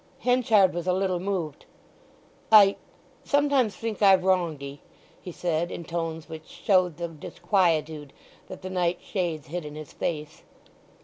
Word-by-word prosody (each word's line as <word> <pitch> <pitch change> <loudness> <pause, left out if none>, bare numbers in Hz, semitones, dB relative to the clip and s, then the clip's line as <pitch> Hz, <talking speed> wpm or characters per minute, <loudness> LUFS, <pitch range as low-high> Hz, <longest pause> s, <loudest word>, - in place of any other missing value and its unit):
Henchard 225 -7 +3
was 175 +1 -4
a 180 - +3
little 185 -1 0
moved. 175 -6 -4 0.8
"I—sometimes 240 +4 +2
think 225 +2 -5
I've 190 -2 +6
wronged 175 -6 +1
'ee!" 140 +1 -8 0.4
he 180 - -8
said, 170 0 -1
in 170 - -6
tones 165 -1 -4
which 160 -1 -9
showed 185 -5 +1
the 170 0 -3
disquietude 160 -3 -1 0.4
that 185 - -10
the 185 - -5
night 180 -1 0
shades 165 -8 -3
hid 175 +1 -4
in 150 0 -8
his 155 -2 -9
face. 150 -3 -4
175 Hz, 140 wpm, -26 LUFS, 160-195 Hz, 0.8 s, I've